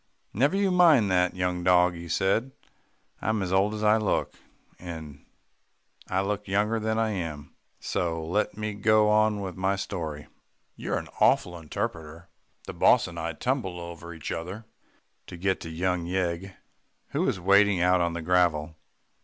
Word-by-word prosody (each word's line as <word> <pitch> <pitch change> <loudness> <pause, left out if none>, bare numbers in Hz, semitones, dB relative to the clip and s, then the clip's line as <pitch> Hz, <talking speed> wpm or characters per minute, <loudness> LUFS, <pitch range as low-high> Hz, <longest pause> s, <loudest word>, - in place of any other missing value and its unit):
"Never 140 - +2
you 200 -1 +2
mind 160 - +5
that, 90 0 +2
young 90 -1 -1
dog," 90 0 +4
he 85 0 -8
said. 105 +10 0 0.7
"I'm 110 -1 0
as 90 0 -3
old 100 +3 +2
as 105 - -4
I 105 +1 +5
look, 110 -2 -1 0.5
and 80 -5 -9 0.9
I 95 +1 +1
look 105 +1 -3
younger 105 +3 +1
than 110 0 -1
I 110 -1 +1
am, 80 -7 -5 0.3
so 80 -2 -2
let 100 +4 -1
me 110 -1 -3
go 105 +1 +3
on 105 -1 +3
with 95 -2 -5
my 95 +1 0
story. 80 -7 -5 0.5
You're - - -3
an - - -6
awful 90 - +3
interrupter. 80 +1 -5 0.3
The - - -7
boss - - +4
and 85 0 -8
I 85 0 -3
tumbled 95 - -2
over 85 0 -8
each 80 -3 -6
other 95 +7 -5 0.6
to 90 - -9
get 95 +2 0
to 80 - -7
young 85 +1 -1
Yeg 90 +1 -2 0.5
who - - -1
was - - 0
waiting 100 +1 +4
out 90 +1 +3
on 85 -1 0
the 85 -1 -5
gravel. 80 -3 +1
90 Hz, 165 wpm, -27 LUFS, 85-105 Hz, 0.9 s, mind